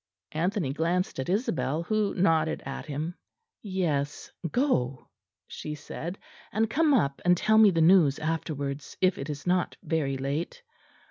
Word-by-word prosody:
Anthony 170 -2 -1
glanced 170 +1 0
at 130 - -3
Isabel, 165 - 0
who 215 +2 0
nodded 165 -4 +2
at - - -6
him. 155 +4 -3 0.5
"Yes; 165 -8 -2 0.2
go," 135 - 0 0.4
she 150 0 -6
said, 170 +5 -6 0.3
"and 220 +1 +1
come 310 +2 +3
up 140 - +1
and 180 0 +4
tell 220 +4 +4
me 215 -2 +8
the 165 -3 +1
news 160 -5 +6
afterwards, 145 -3 -3
if 185 0 +2
it 140 - -5
is 145 -2 -5
not 180 0 +1
very 140 -5 0
late." 145 - -3
165 Hz, 145 wpm, -28 LUFS, 145-190 Hz, 0.5 s, me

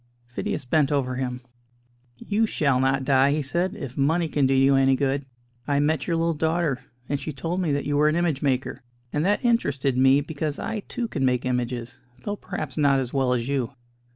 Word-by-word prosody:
Phidias 120 +1 -4
bent 150 +2 +2
over 130 -3 0
him. 125 -1 -3 0.8
"You 215 - 0
shall 140 -9 +1
not 135 0 +1
die," 135 +1 +4
he 150 0 -1
said, 175 +8 -1
"if 140 - -7
money 160 +5 +1
can 145 -3 +1
do 135 - +2
you 135 +1 +5
any 135 0 +4
good. 135 0 -1 0.4
I 140 -1 +2
met 150 +2 0
your 170 - +1
little 165 0 +1
daughter, 160 -3 0 0.3
and 145 - -1
she 155 - -5
told 165 +6 -3
me 165 -5 0
that 140 - -1
you 145 0 0
were 150 +1 +4
an 155 - +2
image 170 -5 0
maker; 135 -2 -1 0.3
and 150 - +1
that 205 +4 +1
interested 140 - +1
me, 135 +2 +5
because 150 0 -4
I, 225 - -3
too, 240 - -3
can 145 -10 -3
make 125 -1 +1
images, 125 -1 -3 0.2
though 205 - -2
perhaps - - -6
not 140 -2 +4
as 125 -2 -4
well 135 -2 +1
as 120 -1 -1
you. 135 -2 -1
140 Hz, 210 wpm, -25 LUFS, 130-160 Hz, 0.8 s, you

